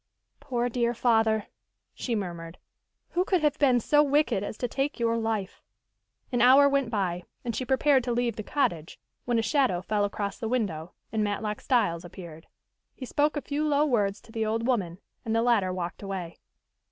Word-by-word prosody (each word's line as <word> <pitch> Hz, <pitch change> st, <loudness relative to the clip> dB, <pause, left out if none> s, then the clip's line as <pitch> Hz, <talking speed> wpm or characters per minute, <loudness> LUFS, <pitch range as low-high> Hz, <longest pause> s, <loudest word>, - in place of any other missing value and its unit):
"Poor, 245 Hz, -3 st, -1 dB
dear 240 Hz, 0 st, 0 dB
father," 220 Hz, -3 st, +2 dB, 0.5 s
she 240 Hz, -, -3 dB
murmured. 170 Hz, -4 st, -5 dB, 0.5 s
"Who 355 Hz, -, +1 dB
could 370 Hz, -4 st, +1 dB
have 300 Hz, 0 st, +1 dB
been 260 Hz, -4 st, +4 dB
so 295 Hz, +6 st, +4 dB
wicked 285 Hz, -7 st, +2 dB
as 210 Hz, -, -5 dB
to 245 Hz, -, -2 dB
take 270 Hz, +3 st, -2 dB
your 230 Hz, -1 st, +1 dB
life?" 220 Hz, -4 st, -2 dB, 0.7 s
An 245 Hz, -2 st, +1 dB
hour 265 Hz, +3 st, +7 dB
went 275 Hz, -3 st, +1 dB
by, 185 Hz, -5 st, -1 dB, 0.2 s
and 235 Hz, -2 st, -2 dB
she 255 Hz, -, -2 dB
prepared 265 Hz, +1 st, +3 dB
to 245 Hz, -, -1 dB
leave 240 Hz, -2 st, 0 dB
the -, -, -4 dB
cottage, 180 Hz, -, -2 dB, 0.3 s
when 240 Hz, -1 st, +1 dB
a 225 Hz, -, +1 dB
shadow 260 Hz, -, +2 dB
fell 205 Hz, +2 st, 0 dB
across 200 Hz, -1 st, -3 dB
the 225 Hz, -, -3 dB
window, 185 Hz, -10 st, -2 dB, 0.2 s
and 220 Hz, -1 st, 0 dB
Matlock 210 Hz, +1 st, -2 dB
Styles 170 Hz, -10 st, +1 dB
appeared. 170 Hz, -3 st, -11 dB, 0.5 s
He 260 Hz, -, -7 dB
spoke 295 Hz, +4 st, +1 dB
a -, -, -1 dB
few 290 Hz, +2 st, -2 dB
low 295 Hz, -1 st, +3 dB
words 205 Hz, -7 st, +1 dB
to -, -, -17 dB
the 225 Hz, -1 st, -2 dB
old 225 Hz, +1 st, -1 dB
woman, 195 Hz, -9 st, 0 dB, 0.3 s
and 225 Hz, 0 st, -1 dB
the 230 Hz, -, +2 dB
latter 220 Hz, -6 st, +2 dB
walked 180 Hz, -1 st, -5 dB
away. 190 Hz, -4 st, -6 dB
230 Hz, 190 wpm, -27 LUFS, 200-260 Hz, 0.7 s, hour